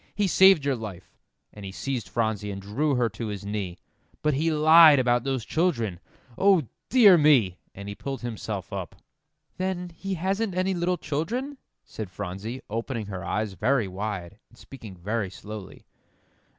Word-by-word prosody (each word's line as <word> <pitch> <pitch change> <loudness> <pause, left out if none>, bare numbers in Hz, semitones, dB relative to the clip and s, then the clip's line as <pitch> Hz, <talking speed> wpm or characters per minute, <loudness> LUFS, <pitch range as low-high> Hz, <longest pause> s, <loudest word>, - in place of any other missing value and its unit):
He 205 - +1
saved 190 -4 +6
your 140 -2 +1
life," 105 -6 -9 0.4
and 105 - -11
he 95 - -6
seized 130 +4 -4
Phronsie 110 -3 -1
and 100 -1 -5
drew 130 +9 -1
her 125 -1 +2
to 110 +2 -6
his 100 -1 -6
knee, 100 -4 -4 0.5
"but 150 0 +2
he 155 +5 +1
lied 155 0 +8
about 120 -2 +2
those 130 -5 -2
children. 115 - 0 0.4
O 195 -4 +5 0.3
dear 210 -9 +7
me!" 125 -12 +4 0.2
And 100 +1 -8
he 100 - -5
pulled 135 +7 -6
himself 110 -5 -5
up. 95 -1 -5 0.6
"Then 185 -1 -2
he 190 +3 -5
hasn't 195 +3 -1
any 185 +1 +1
little 180 0 0
children?" 235 - -3 0.2
said 110 -4 -7
Phronsie, 100 +6 -6
opening 115 +1 -3
her 95 -1 -5
eyes 105 +3 -2
very 115 +2 +1
wide, 95 0 -5
and 120 - -22
speaking 110 -9 -11
very 105 +3 -2
slowly. 105 0 -10
120 Hz, 165 wpm, -26 LUFS, 100-165 Hz, 0.6 s, lied